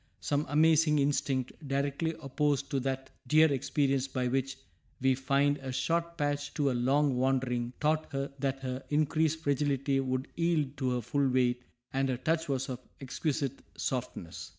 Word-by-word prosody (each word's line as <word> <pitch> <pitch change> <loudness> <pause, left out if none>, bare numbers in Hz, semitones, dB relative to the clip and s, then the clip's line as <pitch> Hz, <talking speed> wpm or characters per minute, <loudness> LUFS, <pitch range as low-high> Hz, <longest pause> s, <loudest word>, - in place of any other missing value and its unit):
Some 145 +1 -1
amazing 155 0 +4
instinct, 140 -2 +1 0.2
directly 140 +4 -1
opposed 145 0 0
to 140 - +1
that 130 0 -3 0.2
dear 155 +3 +5
experience 135 0 +1
by 130 -2 -1
which 135 +1 -1 0.4
we 130 0 +3
find 140 +2 +1
a 135 -1 -5
short 170 +6 -1
path 145 -1 -1
to 140 -3 +2
a - - 0
long 135 +2 +2
wandering, 125 -2 0
taught 155 +1 +1
her 140 0 -2
that 135 -1 -2
their 130 +1 -3
increased 155 +1 +1
fragility 140 -1 +1
would 130 0 -1
yield 160 -5 +1
to 130 -2 0
her 125 - -1
full 140 +4 +1
weight, 125 -1 +2 0.3
and 135 0 +1
her 125 - 0
touch 160 +4 0
was 135 -1 -1
of 125 -2 -4 0.2
exquisite 140 0 -2 0.2
softness. 125 -9 -4
140 Hz, 160 wpm, -30 LUFS, 130-150 Hz, 0.4 s, dear